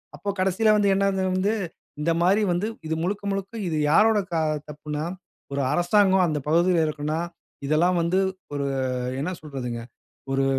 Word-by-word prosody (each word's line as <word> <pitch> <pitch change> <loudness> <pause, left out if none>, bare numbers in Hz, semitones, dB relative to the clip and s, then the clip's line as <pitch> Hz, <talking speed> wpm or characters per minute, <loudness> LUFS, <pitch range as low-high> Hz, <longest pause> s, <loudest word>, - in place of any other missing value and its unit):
அப்போ 205 - -5
கடைசியில 190 +4 +3
வந்து 205 -1 +3
என்ன 195 0 +2
இது 190 0 0
வந்து 195 +3 +1 0.5
இந்த 165 +3 +2
மாரி 190 +5 +4
வந்து 175 +4 0 0.2
இது 160 - -1
முழுக்க, 200 +3 -2
முழுக்க 195 +1 -4
இது 160 -2 -1
யாரோட 215 +6 +5
க - - -5 0.4
தப்புன்னா, 150 +1 -4 0.5
ஒரு 140 - 0
அரசாங்கம் 190 +1 +4
அந்த 150 -2 -1
பகுதியில 170 +3 +3
இருக்குன்னா, 155 +1 -2 0.5
இதெல்லாம் 170 +5 +3
வந்து 170 +3 +1 0.4
ஒரு 140 -1 -1
அ - - 0 0.4
என்ன 160 +7 -2
சொல்றதுங்க? 125 -6 -5 0.5
ஒரு 135 0 +2
175 Hz, 160 wpm, -25 LUFS, 150-195 Hz, 0.5 s, யாரோட